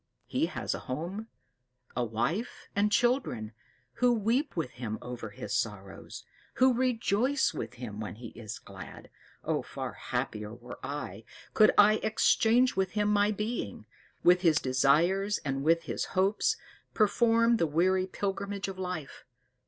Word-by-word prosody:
He - - 0
has - - -3
a - - -4
home, 175 +11 -4 0.7
a 125 - +1
wife, 120 - -2
and 205 +1 +2
children, 235 - +1 0.5
who 250 0 +5
weep 235 - 0
with 155 -6 -1
him 115 -4 -5
over 120 -3 -6
his 100 - -6
sorrows, 105 -6 -4 0.3
who 260 0 +5
rejoice 250 +1 +1
with 115 +2 -5
him 115 -4 -7
when 105 -1 -5
he 115 +1 -9
is 110 -3 -8
glad. - - -11 0.3
Oh, - - 0
far - - -6
happier 105 +1 -4
were 120 +1 -10
I, 115 -8 -5 0.3
could 215 - +6
I 215 +1 +7
exchange 225 +3 +3
with 190 -1 0
him 210 0 +1
my 205 0 +3
being 210 - -3 0.4
with 180 +1 +6
his 165 -4 +4
desires 165 +10 +2
and 135 0 -1
with 165 +2 +3
his 125 -7 -3
hopes 195 +3 +2 0.4
perform 230 +2 +4
the 165 - +2
weary 185 +5 +2
pilgrimage 200 +1 -3
of 190 -1 -6
life! 180 -6 -5
185 Hz, 145 wpm, -30 LUFS, -, 0.7 s, I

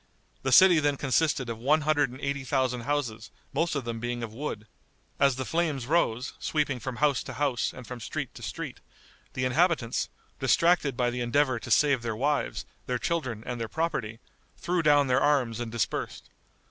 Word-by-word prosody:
The 130 - -1
city 175 +4 +8
then 145 -2 +1
consisted 140 -1 +1
of 115 -1 -5
one 150 +6 +3
hundred 145 -2 +2
and 130 +2 -10
eighty 140 0 -2
thousand 130 -2 0
houses, 120 -8 -2 0.2
most 165 -1 0
of 140 - -1
them 115 -1 -4
being 120 0 -3
of 110 -2 -6
wood. 115 -4 -5 0.5
As 140 -2 +4
the 130 +1 -4
flames 155 -6 -1
rose, 130 -5 +1
sweeping 145 -4 -1
from 125 +2 -5
house 145 -1 +2
to 130 - -7
house 130 -1 0
and 125 - -11
from 125 0 -7
street 110 - -5
to - - -11
street, - - -6 0.5
the 130 - -1
inhabitants, 145 -3 +1 0.3
distracted 165 -7 +3
by 120 -1 +1
the 125 0 -3
endeavor 130 +1 +2
to - - -9
save 140 -4 +4
their 115 -2 -3
wives, 145 +5 -1 0.2
their 125 - 0
children 125 -7 -2
and 120 -1 -4
their 115 - -2
property, 115 -10 -2 0.4
threw 175 +1 0
down 145 -2 +5
their 130 0 +2
arms 130 -6 +2
and 120 -2 -4
dispersed. 115 -2 -3
130 Hz, 185 wpm, -28 LUFS, 120-150 Hz, 0.5 s, city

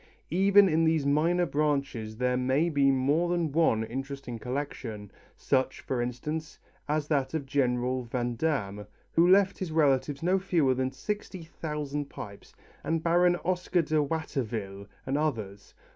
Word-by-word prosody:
Even 195 +3 +6
in 165 -1 +2
these 160 -3 +2
minor 165 +5 +2
branches 140 -8 -1
there 125 +1 +1
may 130 +6 +1
be 140 -3 +3
more 140 +6 +2
than 170 -3 0
one 140 -8 +2
interesting 135 0 -6
collection, 120 -5 -5 0.3
such, 130 0 0
for 130 -2 -2
instance, 150 +6 -4 0.3
as 150 0 0
that 140 -1 0
of 150 -3 -2
General 125 -2 0
Vandamme 120 -4 -2 0.2
who 170 +1 +4
left 195 0 +4
his 185 -4 -4
relatives 145 -1 +1
no 185 +2 +3
fewer 165 -8 +2
than 130 0 -1
sixty 190 +5 -5
thousand 150 -3 -4
pipes, 100 -1 -10 0.3
and 165 0 -1
Baron 175 +1 +4
Oscar 180 -1 +1
de 155 0 +1
Watterville's 115 -10 -3 0.2
and 135 +2 0
others. 110 -10 -3
145 Hz, 145 wpm, -28 LUFS, 125-165 Hz, 0.3 s, Even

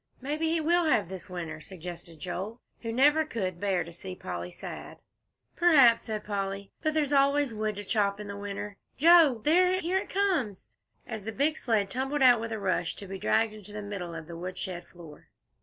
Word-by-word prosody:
"Maybe 300 +5 -1
he 330 0 +2
will 340 +2 +3
have, 210 - +2
this 190 -1 -7
winter," 165 -4 -5
suggested 170 -2 -8
Joel, 190 +7 -5 0.2
who 230 - -3
never 295 +6 +4
could 190 - -3
bear 190 -3 +1
to 170 +1 -11
see 185 +2 -8
Polly 90 - -5
sad. - - -8 0.6
"P'r'aps," 275 -10 +6
said 215 -2 -4
Polly; 195 -1 -3
"but 310 0 0
there's 295 -2 +1
always 280 -2 +3
wood 215 -1 -2
to 205 - -5
chop 200 -1 +1
in 210 - -6
the 200 - -6
winter, 200 0 -6 0.2
Joe. 315 -6 +6
There 365 +4 +4
here 365 +2 +1
it - - -7
comes!" 345 - 0 0.4
as 220 -3 -6
the 225 - -4
big 290 +6 +1
sled 215 -8 0
tumbled 270 +3 0
out 245 -3 +7
with 230 0 -4
a 220 - -2
rush, 185 -4 -1
to 200 - -9
be 195 0 -7
dragged 225 +2 +2
into 210 -1 -11
the 210 0 -5
middle 190 -5 -5
of 165 -1 -7
the 170 +1 -9
woodshed 180 +1 -5
floor. 165 -4 -14
210 Hz, 200 wpm, -29 LUFS, 185-285 Hz, 0.6 s, out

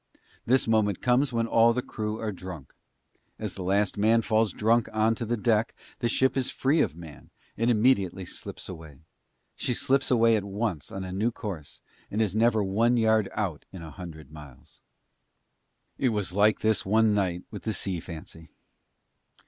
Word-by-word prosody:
This 130 +1 +3
moment 105 -4 +2
comes 125 +2 +2
when 115 -1 0
all 115 0 +4
the 125 +1 -2
crew 105 0 -4
are 110 -1 -2
drunk. 90 -6 -9 0.6
As - - -5
the - - -7
last 100 +2 +1
man 115 +2 +4
falls 110 -1 +2
drunk 115 +2 +2
on 110 +1 +2
to 115 +1 -4
the 120 +1 0
deck, 110 +1 +1 0.2
the 120 - 0
ship 130 +2 +2
is 130 -2 0
free 145 +4 +1
of 80 - 0
man, 80 -3 -12 0.3
and 115 +2 +1
immediately 105 -6 +2
slips - - -8
away. 80 -6 -10 0.6
She 125 - -1
slips 135 +3 +1
away 115 -2 +4
at 105 - -1
once 100 -5 -3
on 95 - -5
a 95 - -6
new 105 +5 0
course 95 -10 -7 0.3
and 105 - -3
is 105 -3 +1
never 110 -1 +3
one 115 +5 +2
yard 110 -3 +3
out 95 -8 -3
in 95 -3 -9
a 80 - -9
hundred 80 0 -10
miles. 75 -4 -14 1.2
It 130 - +2
was 105 -5 -1
like 105 +2 +3
this 110 -1 +2
one 110 +2 +3
night 90 -3 0
with - - -7
the 110 - -2
Sea 95 -2 -2
Fancy. 80 0 -10
105 Hz, 180 wpm, -27 LUFS, 95-115 Hz, 1.2 s, all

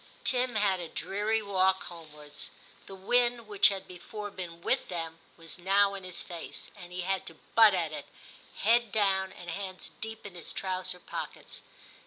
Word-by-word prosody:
Tim 250 -2 +3
had 200 -3 +3
a 175 - -4
dreary 210 +6 0
walk 190 -1 +3
homewards; 150 -4 -8 0.4
the 195 - -8
wind, 240 +4 +2
which 205 -2 +7
had 195 -2 -2
before 205 +4 -6
been 170 -3 -7
with - - +2
them, 165 -2 -4 0.2
was 165 +2 -6
now 200 +2 +4
in 195 -1 -6
his 185 -1 -3
face, 170 -2 -6
and 175 0 -10
he 180 0 -3
had 190 +1 0
to 165 - -6 0.2
butt 220 -3 +8
at 170 -4 0
it, - - -6 0.6
head 235 -1 +5
down, 195 -2 +2
and 175 -2 -7
hands 185 +1 -5
deep 220 0 -6
in 200 - -7
his 175 -2 -6
trouser 185 -1 -2
pockets. - - -5
190 Hz, 175 wpm, -31 LUFS, 175-205 Hz, 0.6 s, butt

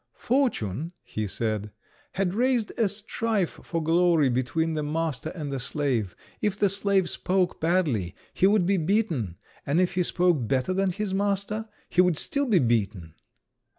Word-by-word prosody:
"Fortune," 170 - 0
he 110 -1 -4
said, 105 0 -2 0.4
"had 190 -2 0
raised 245 0 +1
a 225 -3 +2
strife 210 -1 -2
for 165 -2 -3
glory 165 -3 +3
between 145 +7 0
the 155 - -1
master 155 -1 -2
and 150 -5 -4
the 135 - -2
slave. 130 -7 -1 0.3
If 205 -2 0
the 205 -1 +3
slave 200 -1 +2
spoke 185 +1 0
badly, 155 - +1 0.2
he 190 - +4
would 200 -3 +3
be 195 +2 +2
beaten; 160 - 0 0.3
and 145 +5 +1
if 180 -1 +2
he 180 - +1
spoke 175 -8 +2
better 135 +8 0
than 195 +1 +1
his 200 +1 -3
master, 200 +2 -1 0.2
he 180 - +3
would 180 -4 +2
still 280 - 0
be 215 -6 +4
beaten." 105 - 0
175 Hz, 160 wpm, -26 LUFS, 135-200 Hz, 0.4 s, he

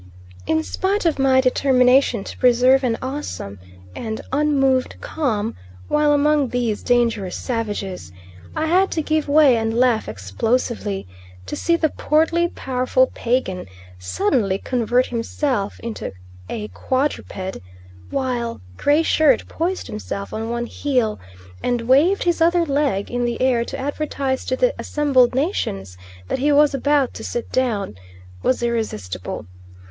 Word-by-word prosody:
In 160 0 +1
spite 390 - -1
of 320 -4 +1
my 265 -1 +4
determination 255 -3 +3
to - - -8
preserve 255 +2 +5
an 235 -3 +1
awesome 260 - -5 0.4
and 220 -1 -4
unmoved 270 -2 +2
calm 230 -8 -2 0.3
while 300 0 +3
among 290 -1 +3
these 235 -4 -1
dangerous 230 -6 +1
savages, 205 - -4 0.4
I 315 - 0
had 370 +4 +3
to 320 - -1
give 310 0 0
way 285 -4 +6
and 225 0 -1
laugh 245 - +2
explosively; 195 - -2 0.4
to 95 - -5
see 335 - +1
the 320 -2 +1
portly, 325 +4 +2
powerful 255 -3 0
Pagan 230 - -1 0.3
suddenly 190 - 0
convert 245 +2 +1
himself 235 -2 -2
into 230 - -5 0.4
a 215 -1 -4
quadruped, 255 -8 -2 0.5
while 250 -3 -2 0.2
Gray 295 +3 +3
Shirt 310 -2 +3
poised 355 +4 -2
himself 200 -2 -6
on 225 +1 -3
one 235 0 -2
heel 245 -5 -1 0.4
and 245 -1 0
waved 285 +11 +3
his 345 -2 0
other 340 +1 +4
leg 280 -9 0
in 245 0 -1
the 240 -1 -1
air 255 -2 +2
to 275 - -6
advertise 275 -1 -2
to 255 - 0
the - - +2
assembled 270 -5 +2
nations 100 - -2 0.3
that - - -2
he 290 +3 +2
was 295 0 +5
about 280 -1 +1
to 220 - -8
sit 240 +1 -4
down, 230 - 0 0.5
was 255 - +1
irresistible. 215 - -3
255 Hz, 135 wpm, -21 LUFS, 225-290 Hz, 0.5 s, way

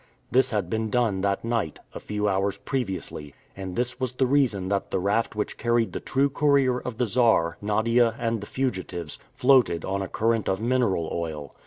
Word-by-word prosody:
This 130 +3 +4
had 105 -5 -1
been 110 +3 -2
done 110 -5 +1
that 100 +2 0
night, 115 -9 -1 0.2
a - - -6
few 105 0 -2
hours 100 0 0
previously, 95 - -4 0.2
and 95 -2 -6
this 125 0 -2
was 130 -2 -2
the 130 +1 +1
reason 125 -9 +2
that 100 -1 -1
the - - 0
raft 100 +5 0
which 105 - -3
carried 120 -4 +1
the - - -3
true 135 +1 +1
Courier 140 -3 +2
of 125 -3 -6
the 125 - +1
Czar, 110 -7 +2
Nadia, 115 +3 +2
and 115 -2 -1
the 105 - -7
fugitives, 95 - -3 0.2
floated 125 - +4
on 100 +1 -2
a 95 - -3
current 115 0 0
of 95 - 0
mineral 115 -8 +1
oil. 80 -4 -4
110 Hz, 190 wpm, -25 LUFS, 95-125 Hz, 0.2 s, This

